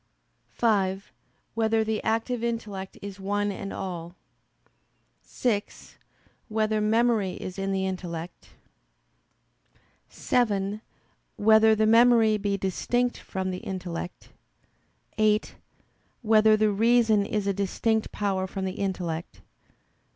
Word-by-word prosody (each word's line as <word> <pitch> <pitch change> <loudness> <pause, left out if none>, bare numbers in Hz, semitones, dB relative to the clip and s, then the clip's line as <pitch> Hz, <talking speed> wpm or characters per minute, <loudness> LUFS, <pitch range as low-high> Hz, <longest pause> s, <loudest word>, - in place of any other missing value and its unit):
(5) 195 -4 0 0.4
Whether 225 0 +1
the 220 -1 -2
active 225 +2 -1
intellect 210 -5 -4
is 200 -1 -7
one 205 +1 -1
in 195 0 -6
all? 175 -2 -6 1.1
(6) 215 -5 -3 0.5
Whether 215 -1 0
memory 220 -3 +2
is 185 +1 -7
in 195 0 -1
the 190 0 0
intellect? 175 -2 -6 1.6
(7) 210 -3 0 0.5
Whether 220 +1 +5
the 215 0 +2
memory 225 -1 +5
be 200 0 -1
distinct 245 +6 -1
from 190 0 -4
the 180 - -4
intellect? 180 -2 -6 0.9
(8) 215 0 +2 0.7
Whether 215 -1 +5
the 215 0 +2
reason 225 0 +3
is 205 0 -2
a 200 - +1
distinct 215 +3 -1
power 190 -2 -1
from 190 0 -4
the 185 - -5
intellect? 175 -4 -4
205 Hz, 105 wpm, -26 LUFS, 190-220 Hz, 1.6 s, Whether